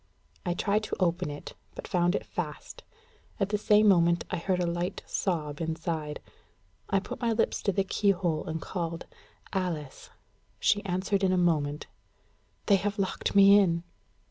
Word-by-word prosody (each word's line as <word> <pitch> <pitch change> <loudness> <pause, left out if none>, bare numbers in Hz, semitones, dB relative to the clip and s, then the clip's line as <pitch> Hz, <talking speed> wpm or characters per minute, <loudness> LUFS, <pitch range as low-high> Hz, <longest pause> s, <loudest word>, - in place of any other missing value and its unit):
I 175 - 0
tried 205 +3 +1
to - - -3
open 180 -2 +1
it, 145 0 -8 0.2
but - - -7
found 175 +1 +2
it - - -3
fast. - - -6 0.6
At 195 -1 +1
the 210 - +1
same 210 0 +4
moment 170 -3 +4
I - - 0
heard 180 +2 0
a 180 - +1
light 175 +1 -2
sob 155 -5 -2
inside. 160 -2 -3 0.7
I 195 - +3
put 195 - -8
my 235 -1 +1
lips 225 0 0
to 200 - +1
the 195 +1 +1
keyhole, 185 -5 0
and 160 0 -3
called 170 -2 -4 0.5
"Alice." 170 -7 -3 0.5
She 205 -1 +2
answered 190 +2 0
in 190 - +3
a 185 - +2
moment: 150 -4 +1 0.8
"They 200 - +5
have 205 +2 -2
locked 195 0 -2
me 200 +1 +8
in." 170 -4 +1
180 Hz, 165 wpm, -28 LUFS, 165-200 Hz, 0.8 s, me